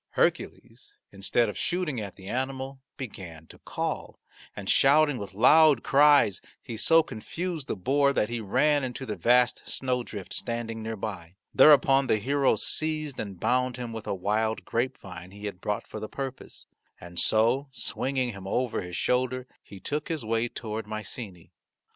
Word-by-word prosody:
Hercules, - - -2 0.2
instead 100 +4 +1
of 105 - -5
shooting 170 -9 -2
at 100 -3 -7
the 95 -1 -12
animal, 130 +2 -3 0.2
began 90 - -8
to - - -16
call, - - -4 0.4
and 100 -2 -7
shouting 145 +1 +4
with 100 -2 -8
loud 155 +7 +6
cries 140 -9 +5 0.2
he 115 - -8
so 165 +9 +5
confused 160 +5 -5
the - - -2
boar 140 +8 +2
that 105 - +1
he 120 +1 -3
ran 145 +8 +2
into 130 +1 -4
the 105 - -4
vast 125 +1 +3
snowdrift 125 -6 -3
standing 115 -1 -4
near 110 0 -4
by. 95 -5 -6 0.2
Thereupon 135 -1 +6
the 110 - +3
hero 135 +4 +2
seized 155 +4 -2
and 100 -4 -6
bound 125 +2 +1
him 120 -2 -5
with 110 -1 -7
a - - -1
wild 110 +4 -1
grapevine 95 -7 -4
he 100 +2 -10
had 100 -3 -6
brought 105 +2 -2
for 110 - -8
the 110 0 -6
purpose. 135 -1 -6 0.3
And 85 0 -6
so 120 +6 +3
swinging 130 +1 -2
him 100 -2 -9
over 125 +4 -1
his 90 -1 -7
shoulder 130 0 0 0.2
he 100 - -12
took 145 +9 -3
his 160 -8 -3
way 115 +1 0
toward 110 -2 -6
Mycenae. 105 -4 -7
120 Hz, 165 wpm, -27 LUFS, 105-135 Hz, 0.4 s, loud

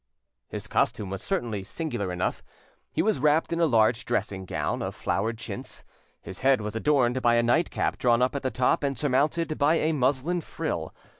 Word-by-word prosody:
His - - -6
costume 100 -3 0
was 95 - -4
certainly 120 - -2
singular 100 - -3
enough: 90 +1 -2 0.5
he - - 0
was 215 -9 +1
wrapped 150 +4 +2
in 170 - -1
a 165 - +4
large 115 -2 +3
dressing 95 -5 -2
gown - - -2
of - - -4
flowered 110 +6 -1
chintz; - - -6 0.4
his 95 - -7
head 135 -1 +4
was 105 0 -4
adorned 130 0 +2
by 120 -1 +4
a 120 - +3
nightcap 120 +8 +1
drawn 120 -1 +3
up 130 - 0
at 140 - -2
the 130 - 0
top 125 0 +1
and 140 -2 -1
surmounted 150 +5 0
by 150 +3 +4
a 160 -1 +1
muslin 145 +5 +1
frill. - - -4
130 Hz, 190 wpm, -27 LUFS, 110-150 Hz, 0.5 s, a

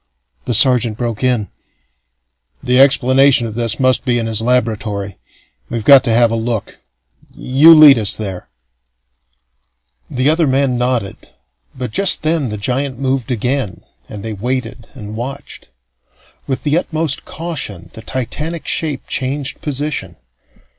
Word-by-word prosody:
The 120 - -1
sergeant 120 -3 +3
broke 120 -1 -4
in: 125 -5 +1 1.1
"The 125 0 +2
explanation 135 -1 +4
of 110 - -6
this 115 +2 -1
must 130 -1 +2
be 125 -3 0
in 115 - -2
his 110 -1 0
laboratory. 110 -5 -1 0.5
We've 115 -2 -4
got 140 -2 +8
to - - 0
have 115 0 +3
a - - 0
look. 115 -2 -4 0.6
You 150 +6 +5
lead 150 -5 +8
us 105 -3 +3
there." 95 -4 -6 1.6
The 130 +2 -1
other 160 +1 +2
man 135 -1 +1
nodded; 125 -4 -3 0.5
but 125 -3 -5
just 195 - +1
then 155 -4 0
the 105 - -5
giant 130 +5 -2
moved 130 -2 -2
again, 125 -2 -2 0.3
and 105 -2 -8
they 110 - -4
waited 120 +2 -4
and 105 -4 -8
watched. 135 +5 -7 0.8
With 130 - -3
the 150 +3 +2
utmost 160 -4 -2
caution 150 - -5
the 110 - -10
titanic 150 +8 -4
shape 150 -4 -3
changed 135 +1 -3
position. 145 - -4
125 Hz, 140 wpm, -16 LUFS, 115-140 Hz, 1.6 s, got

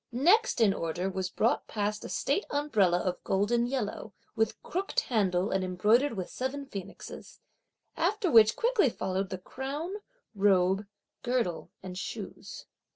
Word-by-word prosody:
Next 360 - +3
in 215 -4 +5
order 175 +3 -2
was 190 -1 -2
brought 225 +5 +1
past 210 0 -2
a - - -6
state 405 - 0
umbrella 215 -12 +2
of 180 -1 -3
golden 235 +5 +1
yellow, 220 -5 -3 0.2
with 220 -1 0
crooked 380 +3 -1
handle 195 -5 +1
and 190 -1 +1
embroidered 215 +10 +3
with 185 -4 -4
seven 270 +2 -4
phoenixes; 200 -8 -9 0.6
after 370 +3 +1
which 220 -2 +7
quickly 465 - +3
followed 190 -3 -2
the 185 - -4
crown, 275 - -5 0.4
robe, 195 -1 +3 0.3
girdle 240 -9 -1
and 185 -1 -6
shoes. - - -7
215 Hz, 140 wpm, -29 LUFS, 190-270 Hz, 0.6 s, which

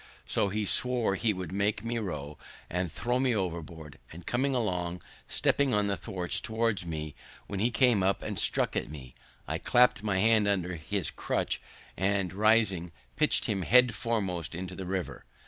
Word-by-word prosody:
So 100 - +1
he 105 +2 -2
swore 125 0 +4
he 110 +3 +1
would 90 -4 -5
make 100 +3 -1
me 115 0 -1
row, 75 -8 -6 0.3
or 90 0 0
throw 120 +9 -2
me 130 -3 +2
overboard; 80 -5 -5
and 85 +2 -11
coming 130 +2 0
along, 90 -6 -2 0.2
stepping 140 -5 +2
on 105 0 +2
the 100 -1 0
thwarts, 90 +1 -3
toward 110 -5 -1
me, 75 -2 -5 0.3
when 100 - -5
he 115 +4 +2
came 120 -3 +3
up 95 +1 +1
and - - -2
struck - - +1
at - - -2
me, 65 -5 -10 0.3
I - - -2
clapped 125 -4 +3
my 105 -3 -1
hand 110 +1 +3
under 90 -3 0
his 85 +3 -3
crutch, - - -2 0.3
and, 95 -1 0
rising, 100 -4 +2 0.2
pitched - - +3
him 100 -2 -1
head 125 +5 +5
foremost 100 -9 -2
into 90 +1 -6
the 95 - -6
river. 95 -2 -4
100 Hz, 175 wpm, -29 LUFS, 90-115 Hz, 0.3 s, head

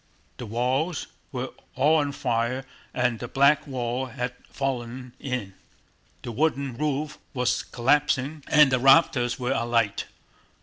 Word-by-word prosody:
The 120 - -7
walls 130 +9 0 0.3
were - - -3 0.3
all 155 +4 +4
on 145 -1 0
fire 125 0 -1 0.3
and 125 -2 0
the - - -5
back 140 +2 +3
wall 125 -1 -2
had 125 0 -4 0.2
fallen 125 -2 -4
in, 125 -8 -4 0.7
the 120 - -5
wooden 140 0 0
roof 150 +2 -2 0.2
was 125 -1 +1
collapsing, 140 +3 +1
and 150 -2 +6
the 130 - +3
rafters 135 -2 +4
were 125 -1 -2
alight. 115 -3 0
130 Hz, 130 wpm, -26 LUFS, 120-140 Hz, 0.7 s, and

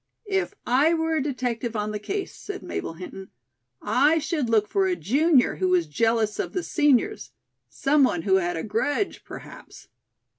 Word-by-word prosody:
"If 385 +1 0
I 285 +7 +3
were 320 0 0
a - - +1
detective 245 -4 -3
on 210 0 -2
the 210 - -4
case," 390 - -4
said 405 -1 -7
Mabel - - -4
Hinton, 185 +2 -9 0.5
"I 290 +10 +3
should 305 -5 -1
look 215 -2 +3
for 390 -1 +1
a 365 - +1
junior 285 - +2
who 185 - 0
was 180 -2 +3
jealous 220 +7 0
of - - -3
the 365 - -2
seniors. 295 - +1 0.4
Some 285 +1 +2
one 180 -10 +1
who 190 -1 +3
had 175 -2 -1
a 160 - -3
grudge, 285 - -1
perhaps." - - -12
255 Hz, 175 wpm, -25 LUFS, 210-320 Hz, 0.5 s, I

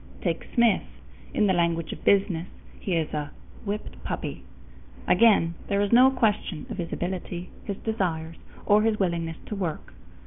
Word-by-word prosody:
Take - - -1
Smith. 235 -5 +5 0.5
In 210 - +2
the 190 - +3
language 170 -2 +1
of - - -11
business 190 -4 +3 0.3
he 185 - -1
is 160 -2 -1
a 150 -1 -2 0.4
"whipped 205 +1 -5
puppy." - - -4 0.7
Again, 195 -5 +5
there 200 - +1
is 205 0 +1
no 250 +3 +8
question 215 - 0
of - - -5
his 170 -1 -3
ability, 180 0 -4
his 200 -2 -3
desires, 165 -7 -2 0.3
or 205 +1 +5
his 220 -1 +2
willingness 170 -3 -1
to 210 - -5
work. 175 -6 -4
190 Hz, 160 wpm, -26 LUFS, 165-210 Hz, 0.7 s, no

